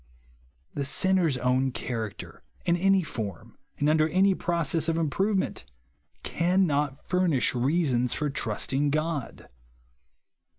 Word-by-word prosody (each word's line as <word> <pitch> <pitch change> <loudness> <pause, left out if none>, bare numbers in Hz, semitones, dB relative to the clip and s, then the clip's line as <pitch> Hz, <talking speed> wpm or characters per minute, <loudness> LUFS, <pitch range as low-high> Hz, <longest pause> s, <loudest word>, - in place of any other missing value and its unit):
The 140 - -2
sinner's 170 0 +1
own 130 +1 +1
character, 115 -5 -6 0.2
in 170 - +3
any 195 +1 +3
form, 105 - -7 0.2
and 145 - 0
under 155 +1 +3
any 190 +4 +3
process 170 -3 0
of 165 - 0
improvement, 190 - 0 0.6
cannot 155 -6 0
furnish 180 -8 +1
reasons 125 -2 +1
for 150 -2 -1
trusting 140 0 -1
God. 155 -2 -3
155 Hz, 110 wpm, -27 LUFS, 135-175 Hz, 0.6 s, in